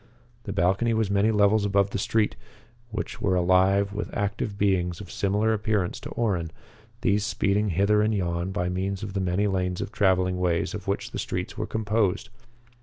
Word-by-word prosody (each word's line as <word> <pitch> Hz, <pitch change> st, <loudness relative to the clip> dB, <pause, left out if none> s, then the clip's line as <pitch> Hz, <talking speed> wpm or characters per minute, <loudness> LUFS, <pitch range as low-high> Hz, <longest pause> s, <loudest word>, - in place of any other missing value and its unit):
The 100 Hz, -, -4 dB
balcony 100 Hz, +5 st, +1 dB
was 110 Hz, -3 st, 0 dB
many 100 Hz, +2 st, +3 dB
levels 105 Hz, 0 st, +3 dB
above 100 Hz, -1 st, +2 dB
the -, -, -2 dB
streets, 110 Hz, +2 st, +1 dB, 0.5 s
which 110 Hz, -1 st, -5 dB
were 95 Hz, -2 st, +2 dB
alive 95 Hz, +3 st, +3 dB
with 105 Hz, -, -4 dB
active 100 Hz, 0 st, -2 dB
beings 90 Hz, -4 st, +1 dB
of 100 Hz, -4 st, -9 dB
similar 105 Hz, +3 st, +1 dB
appearance 105 Hz, -4 st, -1 dB
to -, -, -8 dB
Orrin, 95 Hz, -8 st, 0 dB, 0.5 s
these 100 Hz, -3 st, +2 dB
speeding 105 Hz, -1 st, +1 dB
hither 100 Hz, +4 st, +3 dB
and 105 Hz, +1 st, +2 dB
yon 90 Hz, -2 st, -1 dB
by 90 Hz, -2 st, -1 dB
means 95 Hz, +2 st, -2 dB
of 100 Hz, -2 st, -5 dB
the 100 Hz, -, -1 dB
many 95 Hz, +2 st, +1 dB
lanes 90 Hz, -2 st, -1 dB
of -, -, -4 dB
traveling 95 Hz, -4 st, +2 dB
ways 85 Hz, -2 st, 0 dB
of -, -, -7 dB
which -, -, -2 dB
the -, -, -4 dB
streets -, -, -4 dB
were -, -, -3 dB
composed. 110 Hz, -3 st, 0 dB
100 Hz, 180 wpm, -26 LUFS, 90-105 Hz, 0.5 s, many